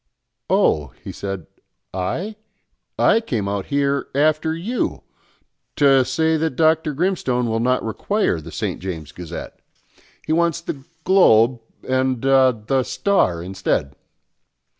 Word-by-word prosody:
"Oh," 75 -2 +2 0.2
he - - -6
said, 95 -4 -5 0.5
"I? 165 - -3 0.6
I 225 - +4
came 115 - -2
out 100 -1 -3
here, 140 0 0
after 155 +2 +2
you, 210 +10 -3 0.7
to 135 -2 +5
say 160 +4 +1
that 160 -3 -1
Dr. 155 0 +2
Grimstone 135 -8 0
will 115 0 0
not 125 +2 +1
require 115 - -1
the 80 +2 -10
St. - - -3
James' 80 -5 -6
Gazette. 85 -1 -8 0.7
He 155 - 0
wants 170 0 +2
the 145 -5 -7 0.2
Globe 125 - +5 0.3
and, 130 -1 0
ah, 135 -1 +5
the 120 +4 -1
Star 120 - +1
instead." 90 -6 -2
130 Hz, 125 wpm, -21 LUFS, 100-160 Hz, 0.7 s, to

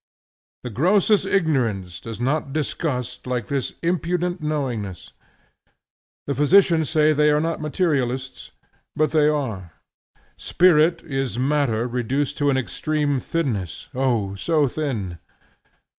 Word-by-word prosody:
The 125 - -5
grossest 195 - +3
ignorance 120 - 0
does 115 -1 -8
not 135 +3 -1
disgust 130 -5 -3
like 125 -3 -2
this 140 -2 -2
impudent 175 +1 -1
knowingness. 125 - -3 1.1
The 140 - -1
physicians 160 +2 +4
say 155 -1 +3
they 150 0 +3
are 150 0 +3
not 165 0 -2
materialists; 135 -5 -1 0.5
but 155 -1 +1
they 155 -2 +4
are: 110 - -2 0.6
Spirit 170 -2 +3
is 135 -5 -3
matter 130 -4 +1
reduced 125 +4 -2
to 145 -1 +2
an 135 - +2
extreme 145 +2 -1
thinness: 120 - -3
O 120 -7 0
so 150 - +1
thin! 115 - -3
140 Hz, 115 wpm, -22 LUFS, 125-155 Hz, 1.1 s, physicians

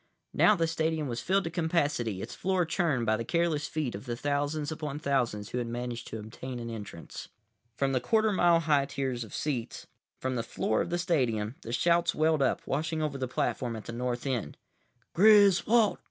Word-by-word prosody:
Now 215 - +5
the 165 -3 +1
stadium 160 -2 -1
was 120 -2 -3
filled 195 +2 +1
to 165 - -4
capacity, 150 - 0
its - - -7
floor 185 -2 0
churned 160 -8 0
by 110 0 +2
the 115 - -3
careless 165 +2 0
feet 150 -6 -2
of 100 +6 -8
the 120 - -2
thousands 145 +3 -1
upon 150 -2 -4
thousands 125 -8 -1
who 125 - -2
had 120 - -3
managed 120 0 -4
to - - -6
obtain 120 +4 -7
an 115 -1 -5
entrance. 105 -7 -8 0.5
From 135 +2 0
the 130 - +2
quarter 220 - +2
mile 175 -3 +4
high 145 -3 +3
tiers 130 -4 -2
of 110 - -12
seats, 130 -7 -3 0.3
from 130 0 -2
the - - 0
floor 110 -1 -1
of - - -3
the 175 - 0
stadium, 125 - 0
the 115 - -7
shouts 170 +7 +2
welled 155 -1 +2
up, 135 - +1
washing 155 +2 -1
over 140 -3 -2
the 130 - -1
platform 125 -1 -1
at 110 - -8
the 115 - -6
North 120 +1 -3
end. 120 - -2 0.6
"Griswold! 210 +2 +5
140 Hz, 195 wpm, -29 LUFS, 120-165 Hz, 0.6 s, Now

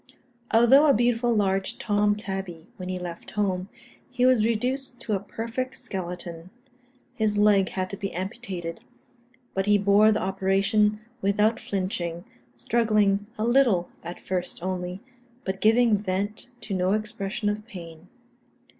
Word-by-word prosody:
Although 250 +6 +6
a 280 - +5
beautiful 240 +1 +2
large 195 -3 +1
Tom 205 -1 +2
tabby 190 -5 -6
when 185 -1 -6
he 185 - -2
left 175 -2 -7
home, 190 -2 -1 0.4
he 250 0 +1
was 255 -4 +5
reduced 245 +3 -1
to 220 - -2
a 195 - +1
perfect 230 +6 -4
skeleton. 180 -6 -6 0.6
His 215 -3 0
leg 205 -2 +4
had 185 -1 -2
to 200 - -5
be 195 -1 -4
amputated; 185 -3 -5 0.7
but 195 +1 -1
he 205 0 +5
bore 205 +2 +5
the 215 - +1
operation 195 +3 +1 0.2
without 210 +3 +2
flinching, 180 -3 -3 0.3
struggling 210 - +2
a 215 - -1
little 235 -8 +3
at 175 +1 -7
first 180 -2 -3
only, 180 0 -3 0.4
but 190 0 -4
giving 225 -1 +4
vent 205 +3 -2
to 205 - -5
no 185 +1 +1
expression 215 -1 -2
of 210 +1 -2
pain. 170 -4 -10
205 Hz, 140 wpm, -26 LUFS, 185-220 Hz, 0.7 s, Although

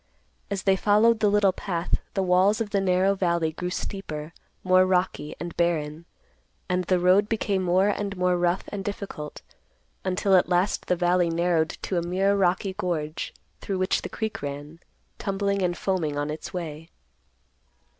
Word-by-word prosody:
As 200 -1 -3
they 195 -1 +4
followed 215 +4 +4
the 210 - +3
little 200 -1 +4
path, 180 -2 -2 0.2
the 195 - +1
walls 185 +4 +3
of 220 -3 -3
the 200 - +1
narrow 190 +1 +3
valley 170 -4 0
grew 180 +3 -4
steeper, 165 -5 -5 0.3
more 185 0 +5
rocky, 180 -5 0
and 170 -1 -6
barren; 165 -2 -1 0.6
and 180 0 0
the 185 +1 +2
road 185 +4 +4
became 205 -3 0
more 185 +2 +3
and 200 -1 -2
more 180 0 +2
rough 175 +1 +1
and 200 -1 -5
difficult, 195 -7 -6 0.6
until 190 +1 +2
at 180 - +4
last 180 +3 +1
the 180 - +2
valley 175 0 +2
narrowed 165 -1 +1
to 180 - 0
a - - -2
mere 190 +4 +1
rocky 190 0 +1
gorge, 160 -4 -3 0.3
through 195 - -3
which 185 0 +1
the - - -6
creek 220 -1 -4
ran, 145 +3 -6 0.4
tumbling 200 0 -1
and 175 -1 0
foaming 165 -7 -1
on 145 +1 -1
its 155 - -6
way. 165 -3 -6
180 Hz, 165 wpm, -25 LUFS, 170-195 Hz, 0.6 s, more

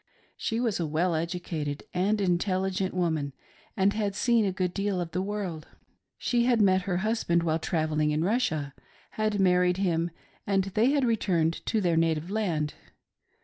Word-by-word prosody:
She 225 - -2
was 230 -6 0
a 165 - -1
well 165 +4 +1
educated 160 -3 -3
and 200 +4 +1
intelligent 185 0 0
woman, 160 -6 0 0.4
and 195 +1 +3
had 205 -2 -1
seen 235 0 +3
a 195 - +1
good 185 -1 -2
deal 200 -2 -1
of 170 -2 -4
the 180 - -1
world. 190 -6 -4 0.5
She 240 -1 +1
had 240 -2 +3
met 190 -2 +4
her 175 - +1
husband 195 -7 +1
while 160 -1 +1
trav 160 -1 -1
elling 155 0 +1
in 150 +1 0
Russia, 175 - 0 0.4
had 215 -1 -1
married 180 -1 +3
him, 170 -3 +1 0.4
and 195 -1 +2
they 215 +6 +2
had 280 -2 +2
returned 175 -8 +1
to 220 - +1
their 170 -3 +2
native 165 +1 +1
land. 170 -9 -1
185 Hz, 170 wpm, -28 LUFS, 165-205 Hz, 0.5 s, met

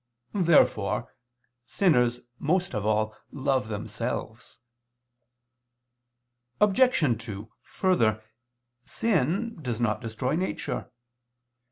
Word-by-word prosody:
Therefore 170 -5 +3 0.5
sinners 125 -11 +2 0.2
most 175 +3 0
of 105 -2 -2
all 110 0 +1 0.2
love 135 -4 0
themselves. 110 +2 -5 2.0
Obj. 200 - +3
2: 105 -1 -7
Further, 110 - +1 0.6
sin 200 - 0
does 120 -5 -3
not 110 -3 0
destroy 120 +4 -2
nature. 185 +3 -3
125 Hz, 75 wpm, -27 LUFS, 110-180 Hz, 2.0 s, Therefore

